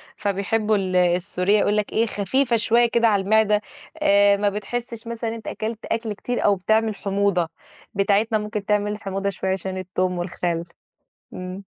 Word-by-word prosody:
فبيحبوا 210 +2 0
ال 185 -2 -1
السورية، 180 +3 +2
يقول 210 +1 +2
لك 210 - -1
إيه 225 +1 +3
خفيفة 235 +5 0
شوية 235 +1 +3
كده 235 0 +3
على 200 -3 +2
المعدة، 210 0 +3 0.4
آآ، 200 0 +5
ما 205 0 +2
بتحسش 230 +3 -5
مثلًا 235 -1 -3
إن - - -4
أنت 225 - -10
أكلت 220 +1 -4
أكْل 225 -2 -2
كتير 245 +4 -3
أو 205 -1 +5
بتعمل 220 +3 +1
حموضة، 195 -4 0 0.4
بتاعتنا 205 +3 +2
ممكن 210 -1 -4
تعمل 210 0 0
حموضة 195 0 -2
شوية 190 0 -2
عشان 190 0 -2
التوم 185 0 -2
والخل. 175 -1 -2 0.7
إمم. 185 +2 -7
205 Hz, 165 wpm, -23 LUFS, 190-220 Hz, 0.7 s, آآ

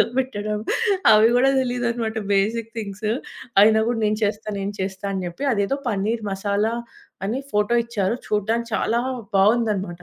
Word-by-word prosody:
పెద్దగా - - -2
పెట్టడం 210 -5 -2 0.5
అవి 215 +2 +6
కూడా 265 +2 +4
తెలీదన్నమాట. 240 -3 -2 0.2
Basic 225 +3 0
things. 210 0 -4 0.5
అయినా 220 +1 +5
కూడా, 240 - -1
నేను 210 0 0
చేస్తా, 210 +1 -2
నేను 195 +1 -3
చేస్తా 190 +1 -4
అని 190 -1 -3
చెప్పి 175 - -10
అదేదో 210 +6 0
పనీర్ 215 +1 -1
మసాలా 205 +3 0 0.5
అని 240 +7 -2
ఫొటో 210 +3 +2
ఇచ్చారు. 225 -2 -1
చూడడానికి 225 +3 0
చాలా 235 +1 +1 0.4
బాగుందనమాట. 200 -4 +1
215 Hz, 145 wpm, -22 LUFS, 200-235 Hz, 0.5 s, అవి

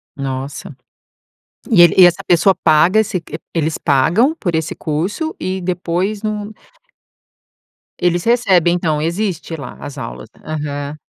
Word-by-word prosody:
Nossa! 135 0 -5 1.0
E 175 - +7
ele 175 - +6
e 185 - +10
essa 175 - +1
pessoa 180 +3 +4
paga 165 +8 +4
se 190 -3 -3
q 155 -1 -8 0.2
eles 160 -1 0
pagam 165 - +2
por 175 -4 -2
esse 160 0 -1
curso 185 - -3
e 185 +1 -3
depois 180 +3 -2
num 210 -1 -4 1.5
Eles 175 -1 +1
recebem 195 -8 +3
então, 160 -4 -1
existe 170 0 -2
lá 135 -5 -9
as 145 0 -8
aulas, 65 - -7
né. - - -22
Aham. 145 -1 -4
170 Hz, 140 wpm, -17 LUFS, 150-190 Hz, 1.5 s, e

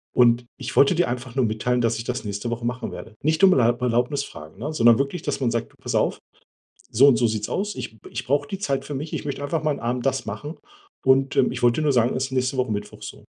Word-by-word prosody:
Und 120 -1 +5 0.2
ich - - -6
wollte 140 +6 +5
dir 175 +1 +2
einfach 125 0 -5
nur 130 -2 +2
mitteilen, 120 +3 0
dass 115 -1 +1
ich - - -4
das 125 -1 -3
nächste 105 +3 -4
Woche 120 0 -4
machen 125 +1 -3
werde“. - - -9
Nicht 160 +5 +1
um 190 -1 +8
Erl 120 -1 +3
Erlaubnis 125 +3 0
fragen, 80 - -11
ne? 150 +7 -4
Sondern 120 -5 +5
wirklich, 140 +6 -2
dass 145 - -2
man 125 -3 +1
sagt: 115 0 -2
„Du - - -25
pass - - -4
auf, - - +1 0.7
so 135 +6 +6
und 130 -4 +5
so 120 - +2
sieht's 110 -1 -2
aus. 205 +2 -2
Ich 110 - -7
ich 120 - -5
brauche 145 +2 +1
die 195 - -5
Zeit 140 -8 -1
für 150 - -6
mich. 150 +3 -5
Ich - - -4
möchte 140 -1 -4
einfach 155 +3 -2
mal 155 - +2
'n 145 - -3
Abend 120 +2 -2
das 135 - 0
machen. 110 +10 -6 0.5
Und, 135 +1 +3
ähm, 125 - +4
ich - - -5
wollte 120 +5 +3
dir - - -1
nur 145 -2 +2
sagen, 120 0 +2
es 130 - 0
ist 135 - -9
nächste 130 +1 0
Woche 130 -3 0
Mittwoch“ 105 0 -5
so. - - -9
125 Hz, 275 wpm, -23 LUFS, 120-140 Hz, 0.7 s, um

